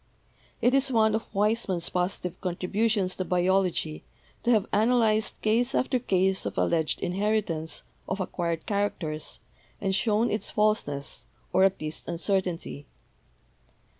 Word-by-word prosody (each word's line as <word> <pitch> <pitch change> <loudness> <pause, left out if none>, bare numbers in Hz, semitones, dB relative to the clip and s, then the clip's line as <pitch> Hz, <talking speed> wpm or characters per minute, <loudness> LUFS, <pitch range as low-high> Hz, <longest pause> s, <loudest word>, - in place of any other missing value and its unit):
It 245 - +4
is 275 0 +3
one 220 -2 +4
of 220 +1 -3
Weismann's 205 -4 +1
positive 180 -1 -2
contributions 190 +2 0
to 185 - -1
biology 180 -3 +1 0.4
to 240 - -1
have 220 -5 +4
analyzed 220 0 +2
case 240 +4 +2
after 255 0 +1
case 190 -4 +1
of - - -4
alleged 160 -2 +1
inheritance 185 -4 -1 0.3
of 190 - -2
acquired 170 -3 -2
characters 185 -7 -2 0.4
and 195 -1 0
shown 215 +3 +2
its 215 - -1
falseness, 210 -10 0 0.3
or 190 - +6
at 195 0 +1
least 155 0 -5
uncertainty. 170 -4 -2
195 Hz, 125 wpm, -27 LUFS, 175-220 Hz, 0.4 s, or